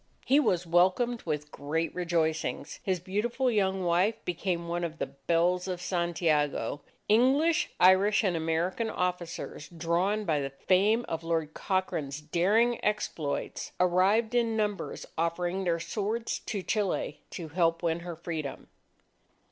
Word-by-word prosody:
He 275 +3 +5
was 180 - +1
welcomed 185 +8 +2
with 150 -1 -3
great 160 +4 -2
rejoicings. 170 -3 -1
His 185 -2 -1
beautiful 230 +8 0
young 190 -3 +1
wife 180 +5 +2
became 175 -1 -2
one 175 +1 -2
of 165 -1 -4
the - - -1
belles 170 +6 0
of 180 -2 -3
Santiago. 165 -5 0 0.3
English, 285 +10 +3
Irish, 190 +4 +5
and 185 -4 +1
American 165 +7 -1
officers, 180 -5 -3
drawn 175 +5 0
by 155 -5 +1
the 135 -1 -2
fame 200 - +2
of 165 0 -3
Lord 165 -2 -1
Cochrane's 155 -7 -2
daring 200 +10 +2
exploits, 170 -8 -2
arrived 190 +6 +3
in 230 -2 +2
numbers 210 -2 -2
offering 175 +3 -1
their 170 -1 +1
swords 210 +7 -2
to 200 -4 -2
Chile 195 -8 -1
to 165 -3 -7
help 165 +1 +1
win 165 0 +1
her 170 0 -6
Freedom. 160 -4 -5
180 Hz, 135 wpm, -29 LUFS, 165-205 Hz, 0.3 s, He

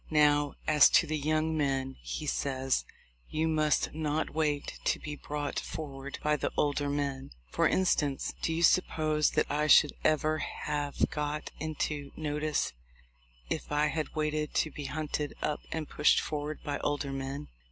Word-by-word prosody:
"Now, 145 -2 +3
as 150 -1 +7
to - - +3
the 155 -1 -2
young 155 +2 +1
men," 135 -3 0
he - - -5
says, 130 - 0 0.4
"you 160 +1 0
must 155 -1 +2
not 155 0 -1
wait 150 -2 -1
to - - +2
be 150 -1 -6
brought 145 0 -3
forward 140 -2 -6
by 150 0 +2
the - - -2
older 145 0 +1
men. 140 -2 -2 0.2
For - - +3
instance, 150 -7 +1
do - - 0
you 165 +1 0
suppose 155 -3 +3
that - - +3
I 150 +1 0
should 150 -1 +7
ever 155 0 +2
have 145 -2 -2
got 150 0 -3
into 150 -2 -3
notice 150 -1 -1 0.7
if - - -4
I 150 +1 +2
had 155 -1 -3
waited 155 0 -1
to 155 - +2
be 145 - -7
hunted 150 0 -3
up 150 - -1
and 160 -2 -3
pushed 150 - +4
forward 150 0 -4
by 145 -1 -2
older 145 -1 -1
men? 135 +2 -5
150 Hz, 160 wpm, -30 LUFS, 145-155 Hz, 0.7 s, as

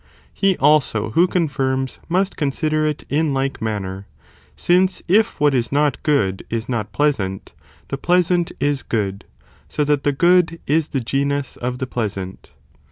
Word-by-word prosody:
He 195 -2 +2
also 135 -7 +2
who 170 +9 +4
confirms, 135 -7 -1
must 185 +3 +1
consider 155 +2 0
it 150 -1 -3
in 150 -1 0
like 135 -2 -2
manner, 100 -3 -4 0.5
since 185 +2 +2
if 210 +4 +2
what 145 -1 +3
is 120 -3 0
not 145 0 +1
good 100 -11 +1
is 115 +1 -3
not 110 -5 -3
pleasant, 100 -11 -1 0.4
the 135 - -3
pleasant 175 0 +2
is 145 -2 0
good, 100 -3 -3 0.4
so 150 - 0
that 145 -1 +1
the 145 - +2
good 170 +2 +3
is 155 +1 +1
the 135 - -2
genus 140 +3 -1
of 125 +1 -4
the 130 - -3
pleasant. 100 -7 -5
140 Hz, 155 wpm, -20 LUFS, 115-160 Hz, 0.5 s, who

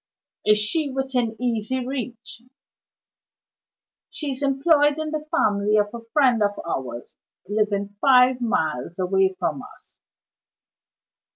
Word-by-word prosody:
"Is 210 0 +5
she 285 +9 +1
within 260 -4 -2
easy 245 +1 -2
reach?" 245 -3 -6 1.7
"She 295 -3 -4
is 265 - -6
employed 290 +2 +3
in 315 -1 -3
the 305 -1 -4
family 205 -2 +2
of 205 +1 +1
a 235 -1 -8
friend 260 -7 +3
of 205 0 0
ours, 125 -6 -5 0.3
living 205 -1 -1
five 255 -1 +5
miles 160 - -1
away 190 0 +1
from 145 -3 -2
us." - - -16
235 Hz, 115 wpm, -23 LUFS, 205-270 Hz, 1.7 s, Is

